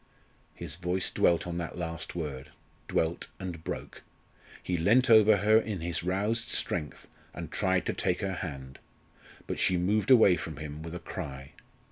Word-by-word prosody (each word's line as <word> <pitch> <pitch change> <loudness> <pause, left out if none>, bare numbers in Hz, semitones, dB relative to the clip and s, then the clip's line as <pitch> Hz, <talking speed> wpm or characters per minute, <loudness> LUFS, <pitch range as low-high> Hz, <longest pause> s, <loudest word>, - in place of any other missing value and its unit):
His - - -6
voice 90 +1 -1
dwelt 85 - +2
on 85 0 -3
that 85 0 -5
last 85 -2 -5
word, 75 -4 -5 0.4
dwelt 80 +1 -1
and 90 -4 -6
broke. - - -6 0.6
He 90 - -1
leant 115 +10 +4
over 110 -1 +7
her 105 +2 +5
in 105 -6 -4
his 85 0 -2
roused 105 +6 -1
strength, 75 -2 -3 0.3
and - - -7
tried 95 -1 +1
to - - -1
take 90 - -1
her 95 -1 -1
hand. 70 -7 -6 0.7
But - - -4
she 90 - +3
moved 100 +6 +1
away 110 -8 +7
from 80 -1 -6
him 75 0 -7
with 80 +1 -7
a - - -4
cry. 70 -6 -7
90 Hz, 165 wpm, -29 LUFS, 80-100 Hz, 0.7 s, over